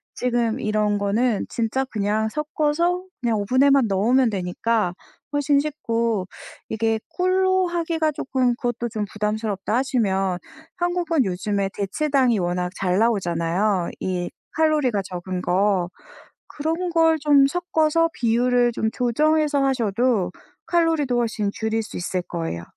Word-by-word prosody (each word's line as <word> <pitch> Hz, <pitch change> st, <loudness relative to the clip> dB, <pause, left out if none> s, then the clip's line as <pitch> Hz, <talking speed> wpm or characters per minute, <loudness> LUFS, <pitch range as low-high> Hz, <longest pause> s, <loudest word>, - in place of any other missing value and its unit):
지금 240 Hz, -2 st, 0 dB
이런 210 Hz, -1 st, 0 dB
거는 210 Hz, +2 st, 0 dB
진짜 235 Hz, +3 st, -1 dB
그냥 215 Hz, -1 st, -1 dB
섞어서 310 Hz, +5 st, 0 dB, 0.2 s
그냥 235 Hz, -4 st, 0 dB
오븐에만 260 Hz, +4 st, +3 dB
넣으면 230 Hz, +6 st, +3 dB
되니까 195 Hz, +1 st, -1 dB, 0.4 s
훨씬 290 Hz, 0 st, +3 dB
쉽고 230 Hz, -9 st, -1 dB, 0.4 s
이게 225 Hz, 0 st, 0 dB
'꿀로 375 Hz, 0 st, +2 dB
하기가 330 Hz, -2 st, 0 dB
쪼끔 260 Hz, -3 st, 0 dB
그것도 240 Hz, -1 st, -3 dB
좀 215 Hz, -2 st, -3 dB
부담스럽다.' 210 Hz, -1 st, -2 dB
하시면 195 Hz, -8 st, 0 dB, 0.4 s
한국은 350 Hz, -5 st, 0 dB
요즘에 195 Hz, +1 st, -1 dB
대체당이 255 Hz, +4 st, +1 dB
워낙 180 Hz, -1 st, -1 dB
잘 185 Hz, +1 st, 0 dB
나오잖아요 185 Hz, -3 st, +1 dB
이 180 Hz, -1 st, -2 dB, 0.2 s
칼로리가 300 Hz, -9 st, +2 dB
적은 180 Hz, 0 st, -5 dB
거. 185 Hz, -1 st, +1 dB, 0.6 s
그런 325 Hz, +4 st, -2 dB
걸 325 Hz, -1 st, +4 dB
좀 285 Hz, -2 st, +5 dB
섞어서 330 Hz, 0 st, +1 dB
비율을 245 Hz, +1 st, +2 dB
좀 220 Hz, -1 st, -1 dB
조정해서 295 Hz, +4 st, +1 dB
하셔도 230 Hz, -6 st, +1 dB, 0.4 s
칼로리도 325 Hz, -7 st, +2 dB
훨씬 220 Hz, -3 st, 0 dB
줄일 220 Hz, 0 st, -1 dB
수 215 Hz, -, -8 dB
있을 180 Hz, +1 st, -2 dB
거예요. 165 Hz, -, -4 dB
235 Hz, 285 characters per minute, -23 LUFS, 200-295 Hz, 0.6 s, 좀